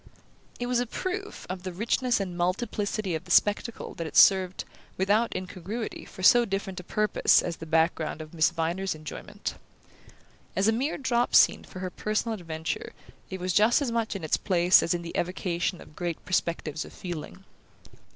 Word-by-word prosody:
It 245 - -2
was 245 0 +1
a 245 - -1
proof 390 - -4
of 185 0 -5
the 185 0 -5
richness 235 +6 0
and 185 -3 -4
multiplicity 200 +2 -1
of 160 +3 -3
the - - -15
spectacle 205 +5 +2
that 165 - -5
it - - -4
served, 190 -2 +5 0.3
without 205 +5 +2
incongruity, 190 +5 -5
for 185 - -10
so 240 +5 +7
different 195 -3 -3
a - - -8
purpose 210 +3 +3
as 170 -2 -3
the 165 - -9
background 160 -1 +1
of 155 0 -9
Miss 160 -1 +3
Viner's 170 +2 -2
enjoyment. 155 -1 -6 1.0
As 195 +2 +2
a - - +5
mere 260 +7 -1
drop 245 -3 +1
scene - - +6
for 185 - -10
her 185 -1 -3
personal 215 +4 -1
adventure 165 -5 -4 0.4
it 190 - -5
was 180 0 -1
just 215 +6 +5
as 275 -5 -1
much 230 -2 -1
in 190 - -5
its 155 - +1
place 180 -1 +4
as 170 - +1
in 170 - -4
the 170 - -7
evocation 175 0 -1
of 150 - -14
great 175 -2 -4
perspectives 165 -3 -1
of - - -12
feeling. 175 +1 -7
185 Hz, 180 wpm, -27 LUFS, 170-215 Hz, 1.0 s, so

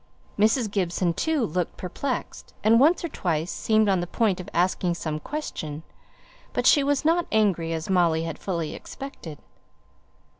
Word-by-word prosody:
Mrs. 220 +1 +2
Gibson, 180 -3 0
too, 310 - 0
looked 180 0 -2
perplexed, 250 +8 -5
and 225 +2 +5
once 325 +6 +4
or - - 0
twice 170 - -2
seemed 220 -1 +2
on 190 -2 +3
the 175 - -4
point 205 -1 +1
of 185 +2 -7
asking 175 0 +1
some 155 -2 -3
question; 155 - -5 0.7
but - - -1
she 290 - +6
was 285 +1 0
not 335 +2 +3
angry 190 -7 +2
as 160 -1 -3
Molly 170 -4 +2
had 165 -2 -5
fully 170 -5 -3
expected. 180 - -8
190 Hz, 155 wpm, -25 LUFS, 165-235 Hz, 0.7 s, she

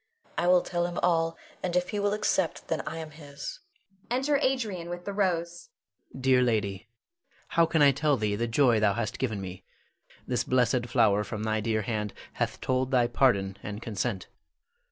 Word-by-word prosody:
I 175 - 0
will 180 0 +5
tell 175 0 -1
him 175 - -6
all, 165 -1 +2 0.2
and 180 -1 -2
if 180 0 +1
he 210 - -2
will 205 0 +1
accept, 190 -4 0
then - - 0
I 160 - -4
am 160 -1 -6
his. 150 - -8 0.5
[Enter 270 +4 +2
Adrian 220 - -1
with 175 0 -6
the 200 - -3
rose. 190 - -1 0.4
Adrian. 130 - -10
Dear 130 -1 +5
lady, 105 -3 0 0.6
how 170 -1 +3
can 160 -2 +3
I 140 - +7
tell 145 +1 +1
thee 105 -2 0
the 120 +3 -1
joy 120 -1 +4
thou 105 -2 +3
hast 115 -3 -3
given 110 -6 -1
me. 95 -1 -7 0.6
This 125 -1 0
blessed 125 -1 +2
flower 105 -4 +3
from 105 +1 -5
thy 110 0 0
dear 110 0 0
hand 105 -1 -3 0.2
hath - - -2
told 130 0 0
thy 125 -3 +3
pardon 105 -6 +2
and 105 0 -6
consent. 110 -2 -3
130 Hz, 185 wpm, -28 LUFS, 110-175 Hz, 0.6 s, I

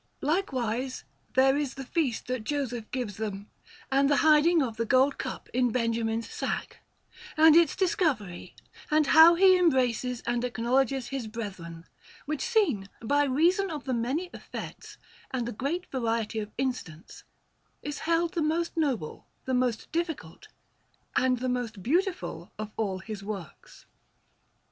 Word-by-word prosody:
Likewise 260 - -1 0.3
there 270 +1 +5
is 285 -2 -2
the 270 - -6
feast 265 -5 -1
that 250 -3 -3
Joseph 245 -4 -3
gives 240 -6 -4
them, 205 -2 -5 0.4
and 275 +1 +3
the 290 - +4
hiding 315 +1 +5
of 230 -4 -4
the 230 - 0
gold 265 +3 +3
cup - - -5
in 250 0 +2
Benjamin's 230 -1 -1
sack, - - -4 0.6
and 315 0 +7
its 335 -3 +5
discovery, 290 - -1 0.3
and 305 0 +3
how 320 +4 +8
he 375 +1 +6
embraces 250 -6 +1
and 240 0 0
acknowledges 250 +2 0
his 270 -5 -4
brethren; 185 -7 -7 0.4
which 300 0 -3
scene, 405 - +1
by 290 +5 +2
reason 345 +9 +2
of 300 -4 -5
the 260 - -2
many 265 +10 -1
effects - - -8 0.3
and 245 -3 -2
the - - -3
great 295 - -3
variety 230 -3 -1
of 210 -1 -5
incidents, 245 -11 -4 0.6
is 295 0 -4
held 335 +1 +1
the 335 - -1
most 325 +2 0
noble, 270 - -2 0.2
the 260 - -2
most 250 -3 0
difficult, 325 - -4 0.7
and 255 -1 +3
the 255 +2 -3
most 245 -6 -3
beautiful 360 - -1
of 215 0 -5
all 200 -4 -1
his 200 +1 -7
works. 195 -6 -8
255 Hz, 145 wpm, -28 LUFS, 225-310 Hz, 0.7 s, how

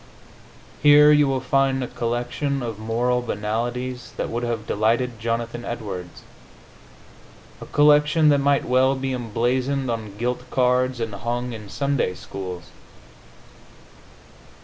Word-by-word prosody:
Here 150 +1 +7
you 150 -1 +5
will 135 -1 0
find 135 0 +1
a - - -4
collection 120 +4 -2
of 115 -3 -5
moral 120 +3 0
banalities 120 +3 -3
that - - -2
would 120 +1 -3
have 115 -2 -3
delighted 115 +3 0
Jonathan 115 +1 -3
Edwards 100 -8 -6 1.4
a - - -8
collection 150 +1 +4
that 145 -1 +4
might 140 0 +2
well 130 +2 +3
be 130 0 -3
emblazoned 125 +3 -1
on 110 -3 -5
gilt 125 +2 -3
cards 125 0 +1
and 115 -2 -3
hung 120 +4 -3
in 105 -3 -9
Sunday 140 -7 -1
schools. 90 -3 -8
125 Hz, 125 wpm, -23 LUFS, 115-135 Hz, 1.4 s, Here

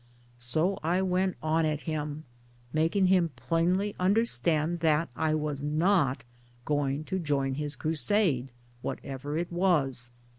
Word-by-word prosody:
" 120 0 -31 0.2
So 180 +5 +2
I 175 +4 +1
went 185 0 0
on 160 +1 +2
at 155 -1 0
him; 150 -1 -4 0.5
making 165 +5 +2
him 180 -2 +3
plainly 170 +11 0
under 200 +5 +3
stand 155 - 0
that 160 0 +2
I 155 +2 +1
was 150 -2 -2
not 150 -1 +2 0.4
going 145 0 0
to 190 +4 -3
join 145 -5 0
in - - -2
his 145 0 -1
crusade 155 - +1 0.3
whatever 140 +4 -4
it 170 +1 -3
was. 145 -9 +1
155 Hz, 145 wpm, -29 LUFS, 145-180 Hz, 0.5 s, him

